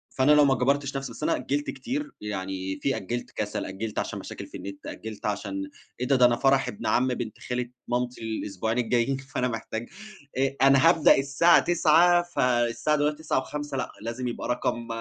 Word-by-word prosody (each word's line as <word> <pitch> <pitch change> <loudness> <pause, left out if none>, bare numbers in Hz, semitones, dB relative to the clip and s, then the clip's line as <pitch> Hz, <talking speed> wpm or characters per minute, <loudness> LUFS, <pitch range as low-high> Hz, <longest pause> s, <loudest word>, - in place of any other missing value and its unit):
فأنا 130 +3 +4
لو 150 -1 +7
ما 135 -1 +4
جبرتش 140 +2 0
نفسي 135 -3 -5
بس 115 - -9
أنا - - +2
أجِّلت 145 +1 -2
كتير، 280 - -4
يعني 95 -2 -4
في 135 - +1
أجِّلت 120 +6 -4
كَسَل، 105 -1 -3
أجِّلت 105 +3 -4
عشان - - -3
مشاكل - - -8
في - - -9
النِت، 100 0 -9
أجِّلت 110 -1 -7
عشان 100 -2 -3 0.3
إيه 125 - -1
ده؟ 135 - +4
ده 125 -1 +6
أنا 120 -1 +4
فرح 135 +1 +3
ابن 105 - -5
عمّي 125 0 +2
بنت 115 -4 -6
خالة 125 -1 -3 0.2
مامتي 125 0 -2
الأسبوعين 110 0 -3
الجايين، 120 +2 +1
فأنا 135 -2 -2
محتاج 115 0 -5 0.5
آآ، 135 +1 +1
أنا 135 +3 +6
هابدأ 165 -3 +5
الساعة 140 +5 +5
21:00، 175 +1 +4
فالساعة 125 -3 +1
دلوقتي 150 +2 -1
21:05 145 0 -2
لأ، - - -3
لازم 120 +3 -4
يبقى 120 - -4
رقم 120 -1 -1
125 Hz, 185 wpm, -26 LUFS, 115-140 Hz, 0.5 s, لو